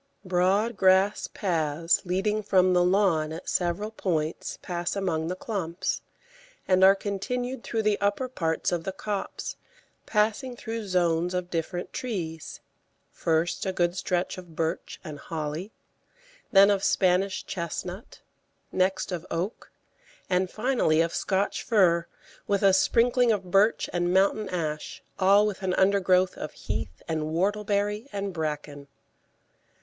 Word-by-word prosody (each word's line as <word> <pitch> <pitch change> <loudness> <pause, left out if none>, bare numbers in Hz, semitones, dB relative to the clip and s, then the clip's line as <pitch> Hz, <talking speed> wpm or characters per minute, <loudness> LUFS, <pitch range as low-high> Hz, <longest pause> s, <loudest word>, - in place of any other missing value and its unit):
Broad 190 +5 +1
grass 190 +2 +3
paths 165 -3 0
leading 205 +4 0
from 185 -3 +3
the 180 0 +4
lawn 180 -5 +2
at 165 +3 -7
several 180 +5 -1
points 160 -7 -2
pass 175 0 -2
among 165 -5 -1
the 180 - -2
clumps, 185 -4 -3 0.7
and 185 0 +4
are 195 +1 +8
continued 245 +6 -3
through 225 -1 -2
the 210 -1 +1
upper 205 +6 +1
parts 165 -11 -1
of 175 -2 -1
the 190 - -3
copse, 205 0 -4 0.5
passing 220 +4 0
through 225 -2 -5
zones 175 -1 +1
of 180 0 -3
different 175 +2 -3
trees; 170 -10 -5 0.5
first 165 +1 0
a - - +1
good 175 -1 0
stretch 180 0 -1
of 175 -3 -13
birch 165 +1 -3
and 150 -2 -7
holly, 160 +6 -5 0.8
then 200 +1 +7
of 200 -1 0
Spanish 190 +1 +2
chestnut, 180 +3 -6 0.5
next 190 +1 0
of 175 -2 -3
oak, 180 +7 -4 0.6
and 180 0 +2
finally 220 -9 +1
of 165 0 0
Scotch 195 +1 0
fir, 175 -7 +3 0.4
with 200 -1 +1
a 195 -1 +6
sprinkling 240 +4 +3
of 190 -4 -2
birch 200 +4 +3
and 175 0 +1
mountain 195 +2 +2
ash, 155 -4 -4 0.2
all 200 +2 +5
with 205 -3 -3
an 185 -1 0
undergrowth 190 -1 +3
of - - -5
heath 75 +1 -5
and 160 -1 -1
whortleberry 205 - 0
and 200 -1 -3
bracken. 150 -3 -4
185 Hz, 135 wpm, -27 LUFS, 170-205 Hz, 0.8 s, are